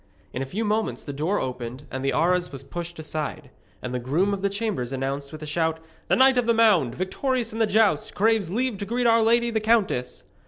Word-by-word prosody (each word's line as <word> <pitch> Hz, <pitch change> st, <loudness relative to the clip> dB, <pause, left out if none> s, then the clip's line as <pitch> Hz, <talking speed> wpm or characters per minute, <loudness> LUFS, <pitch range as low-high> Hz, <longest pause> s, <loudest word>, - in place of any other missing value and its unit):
In 125 Hz, -, -3 dB
a 135 Hz, -, -3 dB
few 215 Hz, +10 st, -3 dB
moments 215 Hz, +1 st, -1 dB
the 145 Hz, -, -6 dB
door 160 Hz, +9 st, 0 dB
opened 125 Hz, +1 st, -5 dB
and 130 Hz, 0 st, -4 dB
the 135 Hz, -, +1 dB
arras 180 Hz, +2 st, +1 dB
was 135 Hz, -1 st, -8 dB
pushed 170 Hz, +4 st, -7 dB
aside, 155 Hz, -2 st, -5 dB, 0.3 s
and 125 Hz, -, -4 dB
the 125 Hz, -, -1 dB
groom 160 Hz, +11 st, +1 dB
of 195 Hz, -, -3 dB
the 200 Hz, -, +1 dB
chambers 200 Hz, -, -2 dB
announced 135 Hz, +1 st, -3 dB
with 155 Hz, -1 st, -8 dB
a -, -, -4 dB
shout: 160 Hz, +1 st, -1 dB, 0.3 s
'The -, -, +3 dB
Knight 260 Hz, -1 st, +5 dB
of 240 Hz, -, -1 dB
the 235 Hz, -, +3 dB
Mound, 200 Hz, -, +4 dB
victorious 235 Hz, +5 st, -1 dB
in 225 Hz, -, -5 dB
the 225 Hz, -, +3 dB
joust, 205 Hz, -7 st, +2 dB
craves 215 Hz, -3 st, +2 dB
leave 235 Hz, +1 st, -1 dB
to 200 Hz, -, -3 dB
greet 245 Hz, +2 st, -1 dB
our 230 Hz, -1 st, +5 dB
lady 235 Hz, +1 st, +3 dB
the 220 Hz, -, +1 dB
countess.' 210 Hz, -, 0 dB
180 Hz, 230 wpm, -25 LUFS, 140-225 Hz, 0.3 s, Knight